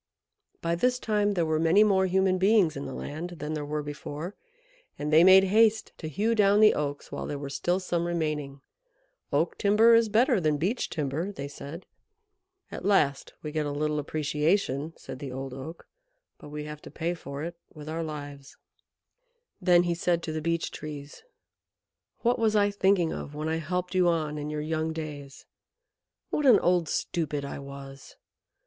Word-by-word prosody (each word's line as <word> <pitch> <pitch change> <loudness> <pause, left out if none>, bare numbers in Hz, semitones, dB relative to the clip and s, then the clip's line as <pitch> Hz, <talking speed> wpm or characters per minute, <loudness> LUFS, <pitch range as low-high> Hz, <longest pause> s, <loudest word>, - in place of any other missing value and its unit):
By 170 0 0
this 250 +9 +2
time 210 -3 +1
there 170 -2 +1
were 155 -1 0
many 165 +6 +5
more 190 -3 +3
human 185 0 +2
beings 195 -4 +4
in 140 - -5
the 135 - -6
land 170 +4 -6
than 150 +1 -4
there 150 -1 -3
were 150 +1 -3
before, 150 +4 -6 0.6
and 150 +1 -3
they 160 +2 +8
made 190 +1 +8
haste 220 +3 +3
to 160 - -5
hew 215 +10 0
down 205 -2 +4
the 215 0 +7
Oaks 145 -1 -4
while - - -4
there 145 - -3
were 140 -1 -6
still 175 +5 0
some 175 -2 -1
remaining. 150 -5 -2 0.7
"Oak - - 0
timber 215 +3 +5
is 230 -1 +5
better 230 0 +3
than 155 -2 +1
Beech 195 - -1
timber," 155 +5 -2
they 140 -8 -6
said. 145 +4 -9 0.9
"At - - -7
last 150 -8 +1
we 150 - -4
get 155 -1 -1
a - - -2
little 150 +1 -1
appreciation," 150 +1 0
said 130 -1 -9
the 135 -2 -6
old 135 0 -6
Oak, 135 +6 -9 0.5
"but - - -11
we 150 0 -5
have 150 0 -8
to - - -11
pay 170 +2 -2
for 140 -4 -7
it 170 +1 -5 0.2
with 150 -1 -11
our 160 +1 -3
lives." 145 -3 -7 1.0
Then 175 -1 +5
he 175 -1 0
said 170 0 0
to 160 - -3
the 155 0 -3
Beech 165 +1 -1
Trees, 145 -2 -8 1.0
"What 240 0 +2
was 220 -1 +2
I 205 -1 +3
thinking 190 -4 +2
of 145 - -7
when 155 +1 -3
I 160 0 0
helped 180 +3 -3
you 185 -1 +3
on 155 -3 0
in 145 +1 -4
your 150 0 -3
young 160 +1 -2
days? 145 -4 -7 0.9
What 295 - +1
an 245 - +8
old 175 -3 +2
stupid 150 -4 -2
I 140 - -6
was! 140 -1 -10
160 Hz, 185 wpm, -27 LUFS, 150-190 Hz, 1.0 s, they